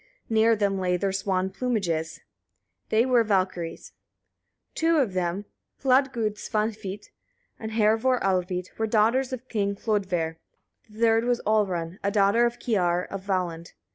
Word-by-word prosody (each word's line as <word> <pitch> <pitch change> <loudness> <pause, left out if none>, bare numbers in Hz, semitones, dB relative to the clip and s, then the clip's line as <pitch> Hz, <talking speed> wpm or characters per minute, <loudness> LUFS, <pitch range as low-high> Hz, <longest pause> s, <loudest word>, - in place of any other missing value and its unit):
Near 225 +1 +4
them 200 -2 0
lay 180 -1 +1
their 195 +2 -1
swan 190 -1 -1
plumages: 185 -9 -2 0.7
they 225 +2 +3
were 250 -3 +4
Valkyriur. 185 -5 -2 0.8
Two 330 0 +2
of 250 -10 +1
them, 185 +2 -2 0.4
Hladgud 255 -5 +2
Svanhvit 210 -2 -3 0.5
and 220 0 -6
Hervor 225 +4 +3
Alvit, 185 -1 -1
were 220 - +1
daughters 230 +5 +2
of 255 0 -6
King 200 -4 -1
Hlodver; 185 -7 -1 0.5
the 215 +1 -14
third 225 0 +4
was 245 -1 +1
Olrun, 190 -5 0
a 200 - +2
daughter 205 +3 +3
of 235 0 -5
Kiar 180 -6 0
of 195 - -4
Valland. 175 -3 -2
205 Hz, 140 wpm, -26 LUFS, 185-230 Hz, 0.8 s, Near